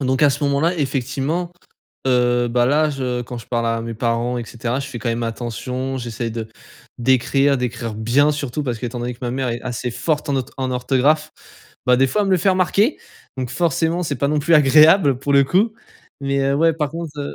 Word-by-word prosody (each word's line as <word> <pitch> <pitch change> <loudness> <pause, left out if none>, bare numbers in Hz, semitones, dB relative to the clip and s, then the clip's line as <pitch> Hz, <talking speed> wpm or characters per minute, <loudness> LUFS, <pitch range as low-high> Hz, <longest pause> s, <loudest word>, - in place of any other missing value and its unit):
Donc 130 +1 0
à 145 - +6
ce 145 - -3
moment-là 150 +5 +1
effectivement, 140 +5 -2 0.5
heu, 120 -1 +2
bah, 120 +1 +2
là 150 +3 +2
je 125 -3 -2
quand 120 0 -7
je - - -12
parle 115 -1 -1
à 115 0 0
mes 115 0 -5
parents 120 +1 -1
et 120 - -4
cetera 120 +4 -3
je - - -6
fais 120 - -7
quand 120 - -3
même 115 +1 -1
attention. 125 +3 -4
J'essaye 115 -1 -4
de 110 -1 -5 0.5
d'écrire 135 +3 +2
d'écrire 120 -2 -3
bien, 125 +8 +2
surtout 145 0 -3
parce 120 -3 -2
que 125 - -4
étant 120 +1 -5
donné 120 0 -3
que - - -23
ma 120 - -2
mère 130 0 -2
est 115 - -4
assez 125 0 -4
forte 155 +1 -2
en 140 - +1
otho 130 - -3
en 130 -1 -2
orthographe. 135 +5 +1 0.6
Bah, 125 0 +5
des 135 - +4
fois, 210 +10 0
elle 200 - -1
me 190 - +2
le 185 - +4
fait 185 - +1
remarquer 190 - +2 0.4
donc 130 -2 -4
forcément 170 +3 0
c'est 145 -4 -2
pas 140 - 0
non 150 0 +1
plus 165 +3 +3
agréable, 150 0 +6
pour 140 +1 -1
le 140 0 +6
coup. 210 +9 +1 0.5
Mais, 140 0 0
heu, 135 0 +1
ouais 165 +3 +3
par 150 -3 -2
contre, 165 -2 -7
heu 140 - -5
130 Hz, 230 wpm, -20 LUFS, 120-150 Hz, 0.6 s, à